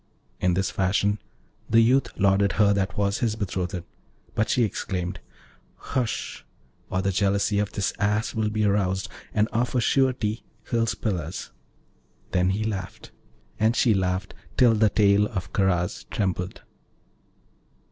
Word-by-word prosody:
In 90 -1 +2
this 95 0 0
fashion 100 +2 +1 0.5
the 115 - +5
youth 125 +2 +4
lauded 100 0 +3
her 100 -2 +4
that 95 -2 -1
was 100 0 +1
his 115 -3 0
betrothed, 95 -3 -3 0.5
but 110 - 0
she 125 - +3
exclaimed, 90 -4 -3 0.6
'Hush! 120 -4 -3 0.5
or 95 +1 -1
the 100 - +1
jealousy 100 +1 +1
of 105 0 -1
this 100 -3 -1
Ass 105 +2 +1
will 110 -2 0
be 105 0 0
aroused, 95 -2 +1 0.2
and 105 0 +2
of 120 +3 -1
a - - +4
surety 120 -4 +1 0.3
he'll 115 -1 +2
spill 105 -4 -1
us.' 85 +3 -6 0.8
Then 90 0 +2
he 100 +3 0
laughed 100 -4 -5 0.5
and 110 +2 +3
she 120 -3 +4
laughed 95 0 -1 0.2
till 120 -3 +6
the 110 -1 +4
tail 100 0 +4
of 95 -3 -5
Karaz 90 -4 0
trembled. 90 -2 -2
100 Hz, 145 wpm, -25 LUFS, 95-110 Hz, 0.8 s, till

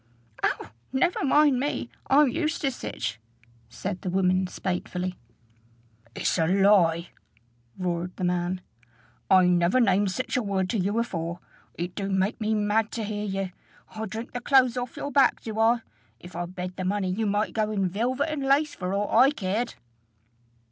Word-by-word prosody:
"Oh! - - -1 0.2
never 310 +7 +1
mind 285 -1 +4
me: 270 -3 -2 0.2
I'm 290 +2 +6
used 315 +6 -1
to 275 -4 +1
sich," 110 - -5 0.5
said 185 -1 -5
the 185 - -3
woman 185 0 +2
spitefully. 180 0 -3 1.0
"It's - - 0
a 160 - +3
lie," 180 -3 +4 0.7
roared 180 -1 -2
the - - -5
man: 180 +1 0 0.7
"I 185 -1 +6
never 180 +5 +3
named 200 -3 +3
sich 255 +7 -3
a 250 - +2
word 195 -3 -1
to 225 - 0
ye 185 - +1
afore. 175 -6 -2 0.4
It 175 +1 -4
do 200 -1 -3
make 190 +4 0
me 215 0 +1
mad 210 +1 +1
to 230 - -2
hear 210 0 -3
ye. 195 -2 -3 0.4
I 220 0 -4
drink 220 +4 -6
the 245 - -5
clothes 255 -2 +4
off 245 -1 -4
your 285 - -4
back, 275 0 +4
do 220 -1 -5
I? 230 +1 +4 0.4
If 175 -1 -12
I 175 0 -3
bed 180 0 -6
the 185 - -3
money, 190 0 0
ye 220 +4 -1
might 205 +1 0
go 215 -1 0
in 195 -3 0
velvet 250 - -1
and 305 -2 -3
lace 280 +3 +2
for 185 +1 -3
aught 205 +1 -1
I 255 +4 +7
cared!" 230 -3 -2
205 Hz, 175 wpm, -26 LUFS, 185-240 Hz, 1.0 s, I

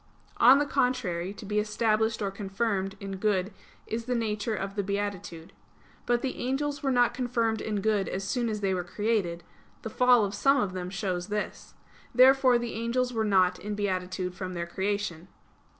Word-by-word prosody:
On 255 +3 +8
the 290 - +2
contrary, 220 -11 0
To 205 - -9
be 210 +1 0
established 215 0 +1
or 195 - -1
confirmed 195 0 -2
in 195 -1 -6
good 195 -1 0 0.3
is 225 +1 -3
of 230 - -17
the 250 - 0
nature 220 -1 -1
of 195 0 -4
beatitude. 200 -4 -4 0.5
But 240 0 +1
the 265 - -2
angels 285 +3 -2
were 275 - 0
not 245 -2 +3
confirmed 235 -3 0
in 210 -2 -2
good 205 -3 +1
as 195 - -3
soon 235 +4 -1
as 210 -1 -3
they 195 -1 +1
were 180 -1 -1
created; 190 -3 -1 0.4
the - - -5
fall 250 -4 +5
of 200 - -4
some 275 +5 +3
of 200 -6 -1
them 180 -1 -4
shows 185 -2 -3
this. 210 0 -5 0.4
Therefore 260 0 +6
the 240 -1 -4
angels 245 +2 -1
were 225 -1 0
not 185 -3 +3
in 210 +1 -4
beatitude 185 -2 -2
from 185 0 -6
their 170 0 -2
creation. 190 -1 -3
210 Hz, 180 wpm, -28 LUFS, 190-235 Hz, 0.5 s, On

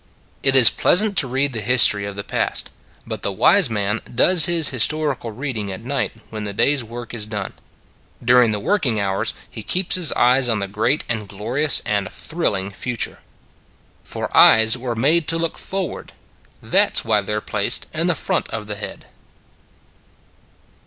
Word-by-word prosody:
It 135 -1 +3
is 130 -4 +9
pleasant 205 +2 +2
to 135 - -1
read 135 +2 0
the 115 - -3
history 105 -4 +5
of 100 - -8
the 100 - -6
past - - -2 0.3
but - - -6
the - - -2
wise 165 - +3
man 105 0 -2
does 160 +7 +5
his 170 -3 +2
histor 150 +3 +1
ical 115 -2 -9
reading 110 -4 -5
at 95 +4 -9
night 130 +2 -3 0.2
when 110 -1 -6
the 100 -1 -6
day 140 - +2
s 140 - -1
work 120 +1 -9
is 105 -3 -3
done. 105 -3 -6 0.7
During 120 -1 +4
the 105 - -2
working 125 - -1
hours 95 -1 -2
he - - -9
keeps 185 0 -2
his 180 -4 +2
eyes 125 +1 +2
on 110 - +1
the 100 -1 -4
great 110 +8 -1
and 110 -3 -4
glorious 125 +10 +1
and 100 -3 -2
thrilling 100 - -3
future. 120 +4 -5 0.8
For - - -7
eyes 110 +1 +6
were 125 -1 -5
made 150 +7 +1
to 165 - -1
look 165 0 -3
forward; 190 -5 -5 0.5
that - - +2
s - - +3
why 110 -2 +1
they 105 +2 -5
re - - -1
placed - - -1
in - - -1
the - - +2
front - - -3
of 105 - -7
the 105 0 -7
head. 105 - -8
120 Hz, 180 wpm, -19 LUFS, 105-145 Hz, 0.8 s, is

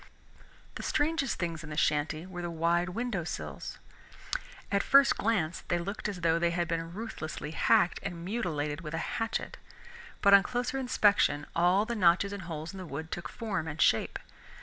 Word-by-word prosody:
The - - -6
strangest 295 -3 0
things 165 -2 -3
in 150 - -8
the 150 - -6
shanty 155 +2 +1
were 180 -1 -7
the 175 - -3
wide 170 +2 +1
windowsills. 195 -4 -4 0.9
At 200 0 +3
first 275 +3 +6
glance 195 -7 0
they 175 - +1
looked 200 +5 -3
as 190 -4 -6
though 165 0 +3
they 170 0 +2
had 170 0 -1
been 165 0 -2
ruthlessly 155 -9 -5
hacked 175 +2 +3
and 175 -3 -5
mutilated 155 -9 -2
with 155 0 -5
a 165 - -3
hatchet, 225 - -2 0.7
but 200 -1 +7
on 200 - +10
closer 245 +6 -2
inspection 205 - +3
all 180 +5 +4
the 235 - -3
notches 190 0 +3
and 200 - -5
holes 160 0 -5
in 195 - -8
the 185 - -6
wood 160 +3 -6
took 175 - -4
form 210 -8 -3
and 155 0 -6
shape. 110 - +3
175 Hz, 175 wpm, -30 LUFS, 160-205 Hz, 0.9 s, on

